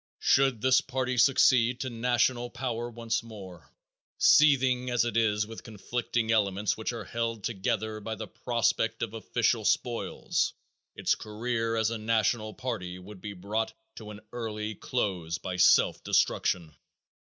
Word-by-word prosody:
Should 135 -5 +3
this 130 +2 +4
party 130 -2 -2
succeed 125 -1 +4
to 130 - -3
national 120 +1 +1
power 120 -2 -4
once 115 -1 -2
more, 95 -7 -12 0.5
seething 130 -4 +4
as 120 -1 +2
it 120 - -3
is 105 -2 +2
with 110 +1 -9
conflicting 115 +1 -3
elements 105 -2 +1
which 110 - -3
are 120 - -6
held 115 -2 -3
together 110 0 -2
by 110 +1 -5
the 110 - -6
prospect 115 -2 -1
of 115 -2 -4
official 110 -3 0
spoils, - - 0 0.4
its - - +1
career 115 +1 -2
as 110 0 +1
a 115 - -3
national 110 0 0
party 105 -9 -4
would 95 +1 -12
be 105 -1 -6
brought 105 +4 -3 0.2
to 110 -2 -9
an 105 0 -9
early 110 -2 -4
close 95 -7 -2
by 90 0 -5
self 90 - +4
destruction. 85 -4 +1
115 Hz, 145 wpm, -28 LUFS, 105-120 Hz, 0.5 s, this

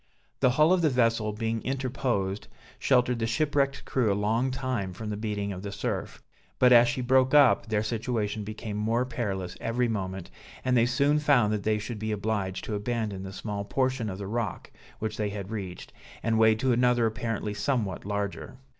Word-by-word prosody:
The 130 - +4
hull 155 +7 +4
of 185 - +2
the 160 - +4
vessel 115 -4 +2
being 115 +1 -2
interposed, 125 -7 -2 0.3
sheltered 125 -2 +2
the 115 - 0
shipwrecked 140 +2 0
crew 120 -6 +1
a - - +1
long 110 +5 +1
time 130 -7 -2
from 105 +3 -6
the - - -2
beating 105 -1 -3
of 90 - -7
the 100 0 -5
surf; - - -4 0.3
but 125 -1 +6
as 120 0 +7
she 125 +2 -1
broke 130 +2 +3
up, 140 -5 +5
their 110 -1 0
situation 110 -2 -2
became 105 0 -5
more 115 +4 +1
perilous 95 -8 -3
every 120 +2 0
moment, 95 -5 -4 0.3
and 130 0 +2
they 120 0 +4
soon 140 +4 +2
found 125 -8 +3
that 105 - -1
they 110 +1 +1
should 105 +1 -5
be 110 +1 -2
obliged 100 -3 -2
to - - -4
abandon 105 -2 -2
the 95 0 -7
small 100 +1 -4
portion 130 0 -1
of 95 - -5
the 100 - -6
rock, 110 -1 -3 0.3
which 110 0 -4
they 105 -1 -1
had 100 0 -6
reached, 95 -5 -6 0.3
and 115 0 +1
wade 110 -1 +5
to 130 -1 +2
another 120 -1 +3
apparently 110 -1 -2
somewhat 105 -3 -1
larger. 100 +4 -4
110 Hz, 190 wpm, -28 LUFS, 105-125 Hz, 0.3 s, as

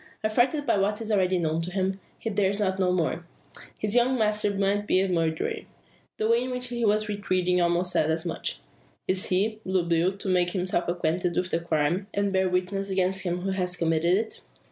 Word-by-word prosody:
Affrighted 245 +7 +1
by 230 -5 +2
what 205 +2 0
is 225 -1 -4
already 190 -3 +2
known 160 -1 0
to 170 - -4
him, 190 0 -1 0.2
he 225 - -4
dares 200 0 +1
not 190 -2 0
know 185 -1 +2
more. 175 -1 0 0.5
His 210 -1 -2
young 245 +2 +3
master 210 -2 +1
may 200 0 +1
be 205 -2 +2
a 195 - +2
murderer? 165 -3 0 0.6
The 215 - 0
way 230 +1 +3
in 255 - -3
which 250 0 -3
he 240 -1 -3
was 215 0 +2
retreating 185 -3 0
almost 175 +1 +1
said 155 - +2
as 160 +2 -1
much. 170 - -3 0.5
Is 185 0 +1
he, 210 +4 +1
Blue 185 -2 0
Bill, 170 +3 +1
to 200 - -7
make 180 -1 +2
himself 180 -2 -1
acquainted 175 +1 -1
with 180 0 -1
the 165 - +1
crime, 170 +3 0
and 200 -1 0
bear 190 0 +2
witness 185 +2 -1
against 190 0 +1
him 180 -1 -2
who 195 +1 -2
has 180 -2 -1
committed 165 +2 +2
it? 220 - -4
190 Hz, 210 wpm, -26 LUFS, 175-205 Hz, 0.6 s, young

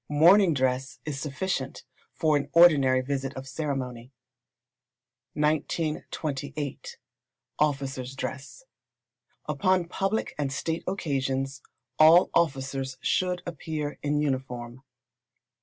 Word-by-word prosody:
Morning 170 +4 +6
dress 130 0 0
is 145 -3 -4
sufficient 140 -1 -3 0.3
for 155 -2 +1
an 145 - -1
ordinary 140 -7 +6
visit 135 0 -3
of 130 0 -7
ceremony. 130 -4 -4 1.2
1938. 150 -2 -2 0.6
Officers' 135 -3 -1
Dress. 140 - -6 0.8
Upon 185 -2 +1
public 195 +5 -2
and 140 -2 -1
state 160 +4 -2
occasions 135 -7 -2 0.4
all 160 +3 +7
officers 135 -4 0
should 180 -1 0
appear 155 -2 -4
in 145 0 0
uniform. 130 -3 -3
145 Hz, 90 wpm, -27 LUFS, 135-160 Hz, 1.2 s, all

